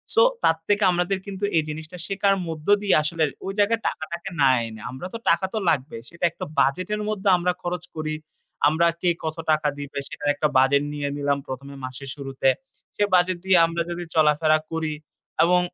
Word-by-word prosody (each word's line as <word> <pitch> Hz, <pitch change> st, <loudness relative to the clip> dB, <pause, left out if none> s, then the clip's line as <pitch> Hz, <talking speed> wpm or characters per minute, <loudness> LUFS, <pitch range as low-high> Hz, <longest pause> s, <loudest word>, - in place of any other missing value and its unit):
So 475 Hz, -, +7 dB, 0.2 s
তার 165 Hz, -, +4 dB
থেকে 205 Hz, 0 st, +2 dB
আমাদের 180 Hz, +2 st, 0 dB
কিন্তু 200 Hz, 0 st, -3 dB
এই 160 Hz, -, +3 dB
জিনিসটা 160 Hz, +3 st, -7 dB
শেখার 195 Hz, 0 st, +2 dB
মধ্য 155 Hz, -2 st, -6 dB
দিয়েই 200 Hz, -6 st, +4 dB
আসলে 160 Hz, +1 st, 0 dB, 0.2 s
ওই 195 Hz, -, -3 dB
জায়গায় 225 Hz, +3 st, +3 dB
টাকা -, -, -7 dB
টাকে 175 Hz, +3 st, -5 dB
না 135 Hz, -, +6 dB, 0.2 s
এনে। 110 Hz, -1 st, -10 dB
আমরা 130 Hz, +8 st, -6 dB
তো -, -, -3 dB
টাকা 170 Hz, +3 st, +3 dB
তো -, -, -1 dB
লাগবেই। 135 Hz, -6 st, -1 dB
সেটা 170 Hz, +1 st, -2 dB
একটা -, -, -6 dB
বাজেট 180 Hz, +9 st, +2 dB
এর 210 Hz, -, -4 dB
মধ্যে 205 Hz, -2 st, 0 dB
আমরা 180 Hz, +1 st, +1 dB
খরচ 175 Hz, -1 st, -3 dB
করি। 155 Hz, 0 st, -2 dB, 0.5 s
আমরা 160 Hz, +3 st, +3 dB
কে 180 Hz, -, +3 dB
কত 160 Hz, 0 st, -3 dB
টাকা 155 Hz, -1 st, +2 dB
দিবে 145 Hz, 0 st, -7 dB
সেটার 145 Hz, -, -3 dB
একটা 150 Hz, +1 st, +1 dB
বাজেট 135 Hz, +2 st, +4 dB
নিয়ে 145 Hz, -1 st, -2 dB
নিলাম 145 Hz, 0 st, +1 dB
১ম 130 Hz, +1 st, -6 dB
এ -, -, -10 dB
মাসের 130 Hz, +1 st, -8 dB
শুরুতে। 135 Hz, -2 st, 0 dB, 0.5 s
সে -, -, +1 dB
বাজেট 180 Hz, 0 st, +3 dB
দিয়ে 190 Hz, -1 st, +5 dB
আমরা 165 Hz, +1 st, -2 dB
যদি 175 Hz, 0 st, -4 dB
চলাফেরা 155 Hz, 0 st, +4 dB
করি 160 Hz, -1 st, -2 dB, 0.5 s
এবং 180 Hz, +2 st, +4 dB
160 Hz, 200 wpm, -24 LUFS, 145-180 Hz, 0.5 s, So